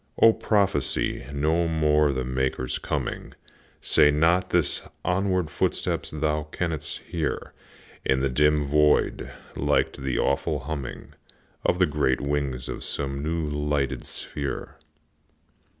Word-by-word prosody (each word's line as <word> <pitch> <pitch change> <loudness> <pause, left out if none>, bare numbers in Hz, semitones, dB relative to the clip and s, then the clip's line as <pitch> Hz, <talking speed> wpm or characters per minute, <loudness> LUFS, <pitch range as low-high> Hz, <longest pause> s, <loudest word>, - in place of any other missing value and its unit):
O, 115 - +8
prophesy 100 - 0
no 80 +4 +1
more 75 -2 +3
the 65 -1 -2
Maker's 65 0 -1
coming, - - -4 0.5
Say 75 - +5
not 80 +5 +2
his - - +2 0.2
onward 90 -2 +1
footsteps - - -1
thou 75 0 -1
canst 80 -4 -3
hear 80 -3 -3 0.5
In 65 - +2
the 70 - +2
dim 75 +3 +3
void, 75 +1 +2 0.3
like - - +1
to - - -11
the 65 -2 -1
awful 75 +1 0
humming 70 -2 -6 0.5
Of 90 - +2
the 90 - +5
great 75 -4 +1
wings 70 -3 -2
of - - -5
some 70 -1 -2
new 80 +1 -1
lighted 75 -3 -1
sphere. 70 -2 -4
75 Hz, 125 wpm, -26 LUFS, 70-80 Hz, 0.5 s, O